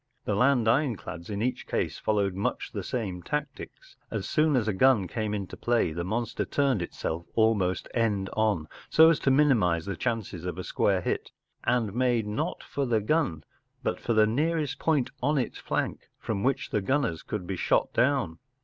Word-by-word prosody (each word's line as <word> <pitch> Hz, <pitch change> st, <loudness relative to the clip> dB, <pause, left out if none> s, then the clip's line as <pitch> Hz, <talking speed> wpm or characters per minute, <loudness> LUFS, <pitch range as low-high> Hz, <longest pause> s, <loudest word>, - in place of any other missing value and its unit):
The 105 Hz, -, 0 dB
land 125 Hz, +2 st, +3 dB
ironclads 110 Hz, -, 0 dB
in 105 Hz, +1 st, -2 dB
each 125 Hz, +1 st, -2 dB
case -, -, -1 dB
followed 100 Hz, -3 st, +1 dB
much 95 Hz, +2 st, -2 dB
the -, -, -4 dB
same 100 Hz, -8 st, -3 dB
tactics. 150 Hz, -, -5 dB
As -, -, -3 dB
soon 155 Hz, -2 st, +2 dB
as 115 Hz, -4 st, +1 dB
a 110 Hz, -, +1 dB
gun 110 Hz, -2 st, +4 dB
came 110 Hz, +2 st, -2 dB
into 100 Hz, -3 st, -4 dB
play 115 Hz, -9 st, +1 dB
the 85 Hz, +2 st, -3 dB
monster 115 Hz, +5 st, -2 dB
turned 135 Hz, -8 st, +1 dB
itself 85 Hz, -1 st, -4 dB
almost 105 Hz, -5 st, +2 dB
end 105 Hz, -5 st, +1 dB
on, 105 Hz, -8 st, +1 dB, 0.2 s
so 160 Hz, +1 st, +7 dB
as 165 Hz, -, +1 dB
to -, -, +1 dB
get 145 Hz, +3 st, +5 dB
the 140 Hz, -, +6 dB
biggest 90 Hz, +2 st, 0 dB
chance 115 Hz, -5 st, -1 dB
of 90 Hz, 0 st, -5 dB
a 95 Hz, -, -4 dB
glancing -, -, +2 dB
hit, -, -, -2 dB, 0.3 s
and 115 Hz, -5 st, +1 dB
made 120 Hz, -2 st, +1 dB
not 105 Hz, +1 st, -3 dB
for 140 Hz, -2 st, -2 dB
the 115 Hz, -2 st, +2 dB
gun, 105 Hz, -, 0 dB, 0.4 s
but -, -, -1 dB
for 115 Hz, -, -1 dB
the 110 Hz, -1 st, +5 dB
nearest 150 Hz, +5 st, 0 dB
point 150 Hz, -6 st, +1 dB
on 145 Hz, +4 st, +2 dB
its 125 Hz, -4 st, -2 dB
flank -, -, -3 dB
from 105 Hz, -3 st, -3 dB
which 135 Hz, +3 st, 0 dB
the 105 Hz, -, +1 dB
gunners 130 Hz, -, 0 dB
could 105 Hz, -4 st, -5 dB
be 95 Hz, -, -3 dB
shot -, -, +1 dB
down. 125 Hz, -, +1 dB
110 Hz, 190 wpm, -28 LUFS, 95-135 Hz, 0.4 s, so